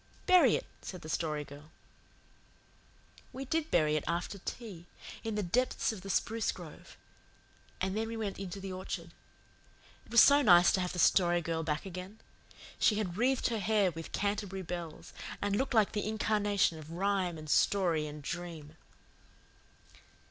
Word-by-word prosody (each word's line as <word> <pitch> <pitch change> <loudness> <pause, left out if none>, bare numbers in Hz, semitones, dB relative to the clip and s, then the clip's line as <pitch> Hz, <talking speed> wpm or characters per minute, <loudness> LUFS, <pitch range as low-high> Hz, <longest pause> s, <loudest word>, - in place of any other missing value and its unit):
"Bury 355 - +6
it," - - -3 0.2
said 185 - -8
the 155 - -8
Story 155 -2 -1
Girl. 145 +2 -13 1.6
We 270 +1 -6
did 320 +3 -1
bury 155 -2 +3
it 155 - 0
after 175 +4 -2
tea, 190 -5 -7 0.4
in 225 -1 -3
the 210 - -1
depths 245 +9 +1
of 215 -4 -8
the 195 - -8
spruce 225 +4 0
grove; - - -12 0.8
and 190 +1 -1
then 220 +1 -1
we 225 0 -5
went 210 -4 -4
into 195 0 -6
the 195 -1 -6
orchard. 175 -2 -5 1.0
It - - -18
was 235 -2 +8
so 285 +1 +6
nice 175 -8 +7
to 190 - +1
have 180 - -2
the - - -6
Story 175 -1 +4
Girl 165 -1 -2
back 150 0 -2
again. 185 +3 -7 0.6
She 215 - +4
had 200 -5 -2
wreathed 250 +5 +2
her 230 -2 -1
hair 205 -3 +2
with 165 0 -8
Canterbury 200 -2 -2
Bells, 170 -2 -7 0.3
and 205 0 0
looked 265 +2 -1
like 215 -2 +4
the 210 -1 -2
incarnation 205 -5 +1
of 155 0 -11
rhyme 185 -1 0
and 155 0 -9
story 165 -2 +2
and 150 0 -8
dream. 165 -2 -6
190 Hz, 165 wpm, -32 LUFS, 170-215 Hz, 1.6 s, was